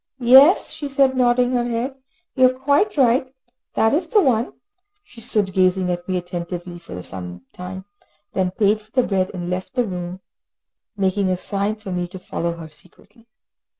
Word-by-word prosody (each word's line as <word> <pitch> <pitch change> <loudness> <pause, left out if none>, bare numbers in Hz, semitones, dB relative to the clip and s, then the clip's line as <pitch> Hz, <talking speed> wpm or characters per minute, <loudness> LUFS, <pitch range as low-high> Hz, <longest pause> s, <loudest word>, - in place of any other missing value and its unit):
"Yes," 265 +8 +6
she 290 -2 -6
said, 270 -1 +3
nodding 245 0 +3
her 245 -1 +1
head. 240 +3 -2 0.4
"You 255 -2 +5
are - - -4
quite 290 +9 +1
right, 255 0 +3 0.4
that 220 - +3
is 330 +3 +1
the 420 - +4
one." 240 -4 +1 0.5
She 250 - -14
stood 210 -5 +1
gazing 185 -1 +2
at 175 +1 -5
me 185 - +1
attentively 175 0 -6
for 130 - -9
some 90 -2 -7
time, 190 +1 -8 0.5
then 185 -1 +1
paid 210 +3 +1
for 215 - -23
the 255 +2 +2
bread, 190 -4 0
and 175 -2 -6
left 185 +7 -4
the 250 - +2
shop, 180 -1 -5 0.8
making 195 0 +1
a 185 - 0
sign 200 +3 -1
for 210 -3 -9
me 180 -1 -2
to 185 +2 -10
follow 170 -2 -3
her 165 -1 -9
secretly. 195 +8 -21
200 Hz, 180 wpm, -21 LUFS, 180-250 Hz, 0.8 s, Yes